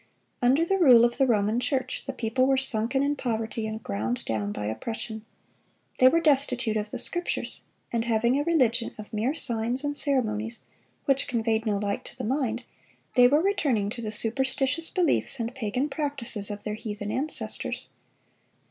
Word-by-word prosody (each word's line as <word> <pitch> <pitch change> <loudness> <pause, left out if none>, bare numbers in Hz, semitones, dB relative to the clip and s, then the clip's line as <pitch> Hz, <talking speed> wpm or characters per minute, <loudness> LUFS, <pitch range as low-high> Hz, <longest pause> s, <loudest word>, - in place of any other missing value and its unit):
Under 265 +7 +3
the 390 +2 0
rule 245 -8 +7
of 240 +2 -2
the 270 - +4
Roman 215 0 +1
Church, 260 0 -2
the - - -1
people 245 +3 0
were 270 0 +3
sunken 260 +1 +1
in 290 +1 0
poverty, 225 -3 -3
and 220 0 -6
ground 110 +5 -3
down 105 -2 -2
by 105 0 -5
oppression. 220 - -5 0.8
They 255 - +7
were 330 +6 +4
destitute 260 -7 +2
of 210 0 -2
the - - -5
Scriptures; 350 0 -2 0.3
and 230 -1 0
having 235 +2 +2
a - - 0
religion 255 -8 +1
of 215 0 -11
mere 230 +8 -1
signs 240 -1 +3
and 290 0 -2
ceremonies, 230 -6 +2 0.4
which 275 -1 +1
conveyed 225 -2 -1
no 205 -2 +1
light 200 0 -3
to - - -10
the - - -5
mind, 245 -1 -1 0.5
they 245 -1 +6
were 295 +5 +3
returning 265 - 0
to 235 - -6
the 220 - -4
superstitious 265 +7 -1
beliefs 340 -6 +1
and 230 +1 -3
pagan 250 +2 -2
practices 275 -9 +1
of 205 0 -6
their 210 - -3
heathen 210 -1 -5
ancestors. 285 +7 -3
235 Hz, 175 wpm, -26 LUFS, 220-270 Hz, 0.8 s, rule